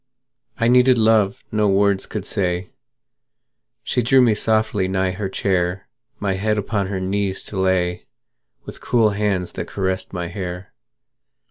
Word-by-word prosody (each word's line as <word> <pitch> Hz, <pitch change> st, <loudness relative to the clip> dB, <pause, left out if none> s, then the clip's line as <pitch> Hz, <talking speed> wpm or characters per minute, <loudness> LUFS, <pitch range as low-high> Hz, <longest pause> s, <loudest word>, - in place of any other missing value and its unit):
I 115 Hz, -, +1 dB
needed 125 Hz, +1 st, +5 dB
love 110 Hz, -3 st, +2 dB
no 105 Hz, -1 st, +2 dB
words 100 Hz, 0 st, +2 dB
could 105 Hz, -3 st, -5 dB
say; 90 Hz, -3 st, -2 dB, 1.1 s
She 125 Hz, -, 0 dB
drew 130 Hz, +3 st, +4 dB
me 120 Hz, -3 st, +5 dB
softly 110 Hz, -2 st, +1 dB
nigh 95 Hz, 0 st, 0 dB
her 95 Hz, +1 st, -4 dB
chair, 90 Hz, -1 st, -1 dB, 0.3 s
My 100 Hz, -2 st, -1 dB
head 105 Hz, +3 st, 0 dB
upon 100 Hz, -1 st, -1 dB
her 95 Hz, -1 st, -3 dB
knees 95 Hz, +1 st, -2 dB
to 100 Hz, -, -6 dB
lay, 90 Hz, -2 st, 0 dB, 0.6 s
With -, -, -10 dB
cool 115 Hz, -3 st, +2 dB
hands 100 Hz, -3 st, -1 dB
that -, -, -6 dB
caressed 95 Hz, -1 st, -3 dB
my 90 Hz, -2 st, -4 dB
hair. 90 Hz, -1 st, -6 dB
100 Hz, 145 wpm, -21 LUFS, 95-110 Hz, 1.1 s, needed